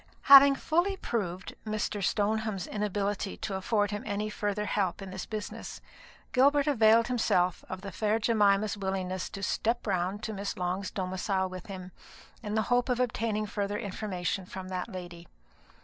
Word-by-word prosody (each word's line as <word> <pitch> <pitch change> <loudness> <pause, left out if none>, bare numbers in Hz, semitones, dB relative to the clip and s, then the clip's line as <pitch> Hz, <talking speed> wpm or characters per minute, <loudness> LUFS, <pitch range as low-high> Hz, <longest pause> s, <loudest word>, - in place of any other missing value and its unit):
Having 275 0 +9
fully 350 +7 +1
proved 185 - -3
Mr. 215 -1 -2
Stoneham's 215 -1 0
inability 205 -1 -2
to 200 - -4
afford 205 +2 0
him 205 0 -3
any 210 0 -2
further 210 0 -2
help 195 -4 0
in 195 -1 -7
this 190 -1 -6
business, 215 -1 -6 0.5
Gilbert 280 +3 +4
availed 230 -5 +5
himself 185 -8 +1
of 185 0 -5
the 200 -1 -7
fair 215 +4 +1
Jemima's 210 -2 +3
willingness 190 -2 -3
to 195 - -7
"step 230 +4 0
round" 190 +1 -1
to 220 - -3
Miss 200 0 -4
Long's 185 +2 -2
domicile 190 0 -1
with 185 -1 -8
him, 185 -2 -7 0.5
in 210 -2 -4
the 220 - +2
hope 245 +1 +2
of 250 -1 +1
obtaining 225 -3 0
fuller 205 0 -2
information 195 -3 -3
from 185 0 -7
that 185 +3 -3
lady. 175 -3 -8
205 Hz, 160 wpm, -29 LUFS, 190-220 Hz, 0.5 s, Having